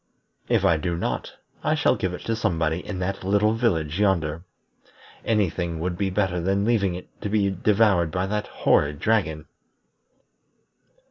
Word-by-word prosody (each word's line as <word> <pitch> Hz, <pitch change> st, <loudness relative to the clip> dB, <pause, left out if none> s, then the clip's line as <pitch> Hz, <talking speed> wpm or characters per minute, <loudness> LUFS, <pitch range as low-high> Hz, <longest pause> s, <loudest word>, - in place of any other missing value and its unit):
If -, -, +2 dB
I 80 Hz, -, +4 dB
do 85 Hz, +2 st, -2 dB
not, -, -, -3 dB, 0.3 s
I -, -, +2 dB
shall -, -, +3 dB
give 95 Hz, -, -2 dB
it -, -, -10 dB
to 115 Hz, -, -2 dB
somebody 85 Hz, -7 st, 0 dB
in 100 Hz, -, -5 dB
that 95 Hz, +1 st, -3 dB
little 100 Hz, +3 st, +2 dB
village 90 Hz, -8 st, 0 dB
yonder. 85 Hz, -6 st, +1 dB, 0.8 s
Any 105 Hz, -3 st, +2 dB
thing 85 Hz, -1 st, -4 dB
would 90 Hz, +2 st, -2 dB
be 95 Hz, +2 st, -1 dB
better 95 Hz, -2 st, 0 dB
than 95 Hz, +3 st, +1 dB
leaving 100 Hz, -6 st, +1 dB
it 90 Hz, -, -8 dB
to 105 Hz, -, -3 dB
be 100 Hz, -2 st, +2 dB
devoured 95 Hz, -2 st, +2 dB
by 90 Hz, +4 st, -1 dB
that 105 Hz, +1 st, -2 dB
horrid 75 Hz, 0 st, +1 dB
dragon." 85 Hz, -5 st, 0 dB
95 Hz, 160 wpm, -24 LUFS, 85-105 Hz, 0.8 s, I